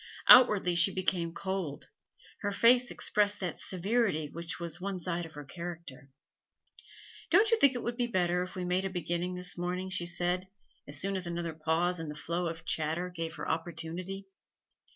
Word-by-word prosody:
Outwardly 210 Hz, -8 st, +8 dB
she 175 Hz, +3 st, +6 dB
became 180 Hz, -2 st, -1 dB
cold; 190 Hz, -5 st, -4 dB, 0.5 s
her 205 Hz, -, -2 dB
face 245 Hz, +4 st, +4 dB
expressed 205 Hz, 0 st, +2 dB
that 180 Hz, -4 st, -4 dB
severity 185 Hz, -5 st, 0 dB
which 170 Hz, 0 st, -5 dB
was 170 Hz, 0 st, -5 dB
one 195 Hz, -1 st, -3 dB
side 175 Hz, -1 st, -2 dB
of 155 Hz, -, -17 dB
her 145 Hz, 0 st, -8 dB
character. 170 Hz, -4 st, -8 dB, 1.2 s
'Don't 440 Hz, +2 st, +5 dB
you 460 Hz, -, +4 dB
think 275 Hz, -, +5 dB
it 245 Hz, -, -4 dB
would 235 Hz, 0 st, -3 dB
be 245 Hz, -1 st, 0 dB
better 180 Hz, -5 st, +1 dB
if 180 Hz, -1 st, -6 dB
we 180 Hz, -1 st, -3 dB
made 180 Hz, +1 st, 0 dB
a 195 Hz, -, -2 dB
beginning 180 Hz, 0 st, -3 dB
this 180 Hz, -1 st, -3 dB
morning?' 180 Hz, +2 st, -3 dB
she 175 Hz, -2 st, +1 dB
said, 175 Hz, +1 st, 0 dB, 0.4 s
as 145 Hz, 0 st, 0 dB
soon 195 Hz, +3 st, 0 dB
as 185 Hz, -2 st, -1 dB
another 170 Hz, -1 st, -3 dB
pause 165 Hz, +3 st, 0 dB
in 160 Hz, -2 st, -5 dB
the 150 Hz, -, -6 dB
flow 170 Hz, +3 st, -2 dB
of 165 Hz, 0 st, -6 dB
chatter 160 Hz, +3 st, -1 dB
gave 165 Hz, -2 st, -4 dB
her -, -, -6 dB
opportunity. 175 Hz, +4 st, -4 dB
180 Hz, 180 wpm, -30 LUFS, 165-190 Hz, 1.2 s, Outwardly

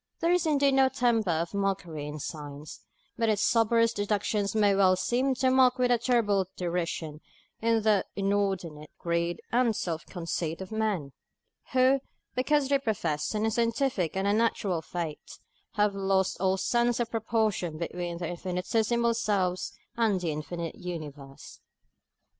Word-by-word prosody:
There 335 Hz, 0 st, +2 dB
is 355 Hz, -2 st, +2 dB
indeed 280 Hz, -2 st, +3 dB
no 265 Hz, 0 st, +5 dB
temper 240 Hz, -6 st, +1 dB
of 170 Hz, +2 st, -1 dB
mockery 185 Hz, -7 st, -2 dB
in 150 Hz, +1 st, -6 dB
Science, 150 Hz, 0 st, -7 dB, 0.4 s
but 230 Hz, -1 st, +2 dB
its 210 Hz, -2 st, +1 dB
soberest 230 Hz, 0 st, +3 dB
deductions 205 Hz, 0 st, -1 dB
may 205 Hz, -2 st, +4 dB
well 190 Hz, -1 st, +4 dB
seem 255 Hz, +8 st, 0 dB
to 260 Hz, +1 st, +2 dB
mock 255 Hz, -1 st, +5 dB
with 250 Hz, -1 st, +2 dB
a 240 Hz, -, +3 dB
terrible 215 Hz, -6 st, +2 dB
derision 170 Hz, -3 st, -3 dB, 0.4 s
the 220 Hz, -3 st, +2 dB
inordinate 195 Hz, -6 st, -1 dB
greed 170 Hz, 0 st, -1 dB
and 235 Hz, -2 st, +2 dB
self 165 Hz, -4 st, -3 dB
conceit 165 Hz, -2 st, -3 dB
of 190 Hz, +1 st, -8 dB
men, 210 Hz, -10 st, -1 dB, 0.6 s
who, 260 Hz, +1 st, +4 dB, 0.3 s
because 280 Hz, +2 st, +2 dB
they 280 Hz, -1 st, +3 dB
profess 185 Hz, -, -2 dB
an 215 Hz, +1 st, 0 dB
unscientific 230 Hz, -, 0 dB
and 190 Hz, -, 0 dB
unnatural 205 Hz, -4 st, +1 dB
faith, 165 Hz, -3 st, -6 dB, 0.4 s
have 210 Hz, -2 st, +2 dB
lost 195 Hz, -1 st, +1 dB
all 190 Hz, 0 st, +2 dB
sense 240 Hz, +4 st, +1 dB
of 240 Hz, -1 st, -1 dB
proportion 220 Hz, -7 st, 0 dB
between 175 Hz, +1 st, -4 dB
their 170 Hz, -1 st, -4 dB
infinitesimal 220 Hz, +7 st, 0 dB
selves 190 Hz, -5 st, 0 dB, 0.3 s
and 220 Hz, -5 st, +2 dB
the 170 Hz, -3 st, -2 dB
infinite 165 Hz, +2 st, -5 dB
Universe. 145 Hz, -6 st, -8 dB
200 Hz, 140 wpm, -28 LUFS, 175-230 Hz, 0.6 s, no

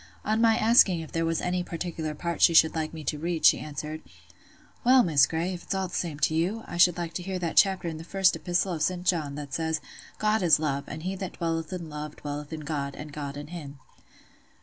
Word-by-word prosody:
On 220 Hz, +1 st, +1 dB
my 225 Hz, -1 st, +4 dB
asking 215 Hz, -6 st, +5 dB
if 160 Hz, -, -9 dB
there 165 Hz, 0 st, 0 dB
was 165 Hz, 0 st, 0 dB
any 180 Hz, 0 st, -1 dB
particular 165 Hz, -3 st, -4 dB
part 170 Hz, +2 st, -4 dB
she 170 Hz, -, +6 dB
should 160 Hz, 0 st, +6 dB
like 160 Hz, -1 st, -2 dB
me 160 Hz, -1 st, -8 dB
to 150 Hz, +1 st, -2 dB
read, 170 Hz, 0 st, -1 dB
she -, -, +7 dB
answered— 155 Hz, +1 st, -6 dB, 0.8 s
"Well, 255 Hz, +1 st, +6 dB
Miss 145 Hz, -7 st, +4 dB
Grey, 165 Hz, +3 st, -2 dB
if 175 Hz, -, -7 dB
it's -, -, -4 dB
all 190 Hz, -1 st, -2 dB
the -, -, -14 dB
same 165 Hz, -5 st, -2 dB
to -, -, +2 dB
you, 185 Hz, +8 st, -1 dB
I 175 Hz, -, -7 dB
should 175 Hz, 0 st, +5 dB
like 170 Hz, -1 st, -4 dB
to 180 Hz, -, -4 dB
hear 190 Hz, +1 st, -4 dB
that 170 Hz, -2 st, -3 dB
chapter 190 Hz, -3 st, +4 dB
in 160 Hz, -1 st, -4 dB
the -, -, -8 dB
First 190 Hz, +2 st, +2 dB
Epistle 175 Hz, +1 st, -1 dB
of 160 Hz, -, -4 dB
St. 180 Hz, +3 st, -1 dB
John, 155 Hz, -6 st, 0 dB
that 145 Hz, -2 st, -7 dB
says, 160 Hz, -1 st, -1 dB, 0.4 s
'God 215 Hz, +1 st, +1 dB
is 165 Hz, -4 st, +5 dB
love, 140 Hz, -3 st, -2 dB
and 155 Hz, +1 st, -7 dB
he 190 Hz, +2 st, -2 dB
that 190 Hz, -1 st, -5 dB
dwelleth 165 Hz, 0 st, -3 dB
in 175 Hz, -3 st, -5 dB
love 150 Hz, 0 st, -7 dB
dwelleth 145 Hz, 0 st, -6 dB
in 160 Hz, -1 st, -5 dB
God, 140 Hz, -2 st, -3 dB
and 150 Hz, -1 st, -9 dB
God 145 Hz, -1 st, -5 dB
in 145 Hz, +1 st, -8 dB
him. 150 Hz, -5 st, -8 dB
165 Hz, 240 wpm, -27 LUFS, 155-180 Hz, 0.8 s, she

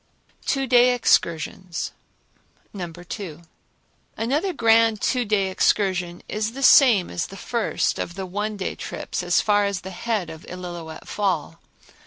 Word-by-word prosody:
Two 270 Hz, -1 st, +1 dB
Day 250 Hz, 0 st, +5 dB
Excursions 170 Hz, -5 st, 0 dB, 0.8 s
No. 180 Hz, -4 st, -5 dB
2. 175 Hz, -1 st, -8 dB, 0.7 s
Another 285 Hz, -, 0 dB
grand 225 Hz, -, +4 dB
two 250 Hz, +2 st, 0 dB
day 200 Hz, -3 st, +1 dB
excursion 185 Hz, -3 st, +1 dB
is 215 Hz, +1 st, -2 dB
the 275 Hz, +1 st, -5 dB
same 235 Hz, -10 st, +6 dB
as 170 Hz, -, -2 dB
the 195 Hz, -, -11 dB
first 230 Hz, +3 st, -1 dB
of 175 Hz, -, -4 dB
the 190 Hz, -1 st, -4 dB
one 205 Hz, +3 st, -3 dB
day 190 Hz, -, -3 dB
trips, -, -, -5 dB
as -, -, +2 dB
far 205 Hz, -1 st, +3 dB
as 200 Hz, -3 st, -2 dB
the 190 Hz, -, -8 dB
head 200 Hz, -3 st, -2 dB
of 160 Hz, 0 st, -11 dB
Illilouette 175 Hz, -3 st, -8 dB
Fall. 180 Hz, -5 st, -1 dB
200 Hz, 145 wpm, -23 LUFS, 175-230 Hz, 0.8 s, same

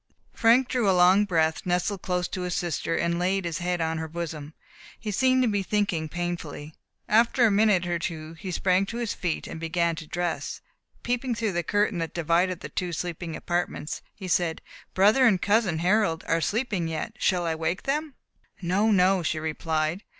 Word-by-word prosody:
Frank 240 Hz, +3 st, +4 dB
drew 240 Hz, -6 st, +1 dB
a 185 Hz, -, +3 dB
long 185 Hz, +3 st, +6 dB
breath, 160 Hz, -4 st, +1 dB
nestled 180 Hz, +2 st, -1 dB
close 180 Hz, -1 st, -1 dB
to 185 Hz, -, -4 dB
his 180 Hz, -1 st, -2 dB
sister, 165 Hz, -1 st, -1 dB
and 170 Hz, 0 st, 0 dB
laid 190 Hz, +1 st, 0 dB
his 170 Hz, -1 st, -3 dB
head 180 Hz, 0 st, -1 dB
on 160 Hz, 0 st, -1 dB
her 160 Hz, -, -4 dB
bosom. 155 Hz, -2 st, -6 dB, 0.4 s
He 215 Hz, -, -4 dB
seemed 255 Hz, +5 st, +3 dB
to -, -, +2 dB
be 205 Hz, -2 st, +1 dB
thinking 190 Hz, -6 st, -1 dB
painfully. 170 Hz, -4 st, -5 dB, 0.3 s
After 235 Hz, +3 st, +4 dB
a 220 Hz, -, +4 dB
minute 200 Hz, -3 st, +3 dB
or 175 Hz, -1 st, -1 dB
two 160 Hz, -1 st, -5 dB
he 185 Hz, +4 st, -8 dB
sprang 185 Hz, +2 st, +1 dB
to 230 Hz, -, -5 dB
his 235 Hz, -3 st, -2 dB
feet, 175 Hz, -4 st, -3 dB
and 160 Hz, -, -7 dB
began 165 Hz, +1 st, 0 dB
to 160 Hz, -, -8 dB
dress. 175 Hz, 0 st, -3 dB, 0.4 s
Peeping 245 Hz, 0 st, -1 dB
through 225 Hz, -2 st, -1 dB
the 175 Hz, -1 st, 0 dB
curtain 205 Hz, +1 st, 0 dB
that 165 Hz, -1 st, -4 dB
divided 170 Hz, +2 st, +1 dB
the -, -, -7 dB
two 180 Hz, -2 st, -3 dB
sleeping 170 Hz, -1 st, -4 dB
apartments, 175 Hz, -2 st, -3 dB
he 190 Hz, -, -7 dB
said, 170 Hz, -1 st, 0 dB, 0.3 s
"Brother 215 Hz, +7 st, +5 dB
and 190 Hz, -5 st, +3 dB
cousin 205 Hz, -4 st, +2 dB
Harold 180 Hz, -1 st, +1 dB
are 165 Hz, 0 st, +1 dB
sleeping 210 Hz, -4 st, -1 dB
yet, 160 Hz, +6 st, -4 dB
shall 180 Hz, -3 st, +1 dB
I 165 Hz, -, 0 dB
wake 160 Hz, +3 st, -2 dB
them?" 295 Hz, 0 st, -2 dB, 0.4 s
"No, 195 Hz, +5 st, +1 dB
no," 190 Hz, -2 st, +4 dB
she 160 Hz, -1 st, -1 dB
replied. 160 Hz, +2 st, -1 dB
180 Hz, 190 wpm, -26 LUFS, 165-205 Hz, 0.4 s, long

